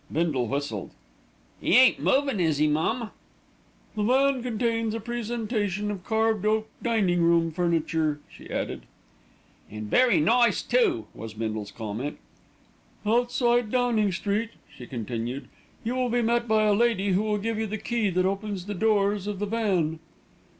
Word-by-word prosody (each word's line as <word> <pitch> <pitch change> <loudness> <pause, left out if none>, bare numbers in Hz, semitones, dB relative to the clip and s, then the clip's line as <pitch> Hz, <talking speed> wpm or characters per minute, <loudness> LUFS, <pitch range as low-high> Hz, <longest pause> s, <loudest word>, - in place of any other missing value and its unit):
Bindle 155 -7 0
whistled. 135 -6 -3 0.7
"'E 210 - +4
ain't 255 0 +6
movin', 275 -5 +1
is 160 -4 +1
'e, 155 - +4
mum?" 165 +10 0 0.8
"The 210 - -2
van 265 +4 +3
contains 230 -2 -1
a - - -2
presentation 220 -3 -2
of 195 -3 -6
carved 220 -1 +1
oak 215 +1 +1
dining 200 -7 +1
room 170 -1 +3
furniture," 160 -3 0
she - - -14
added. - - -4 0.8
"An' 105 0 -6
very 255 -1 +4
nice 235 +9 +3
too," 405 -9 +2
was 110 -1 -8
Bindle's 110 -2 -3
comment. 115 +6 -5 0.9
"Outside 240 +1 +2
Downing 235 -4 +2
Street," 205 +5 -1 0.3
she 125 - -10
continued, 120 +2 -4 0.4
"you 235 +2 -1
will 255 -1 0
be 240 0 +1
met 235 +1 +1
by 215 -1 +3
a 210 -1 +4
lady 205 -2 +2
who 190 +1 +2
will 215 -1 0
give 220 +1 -2
you 220 - -1
the 215 +1 -3
key 230 -1 -1
that 185 0 +1
opens 195 -1 -2
the 205 - -4
doors 205 -1 +1
of 205 -1 -3
the 205 - -2
van." 190 -8 0
210 Hz, 155 wpm, -26 LUFS, 170-230 Hz, 0.9 s, ain't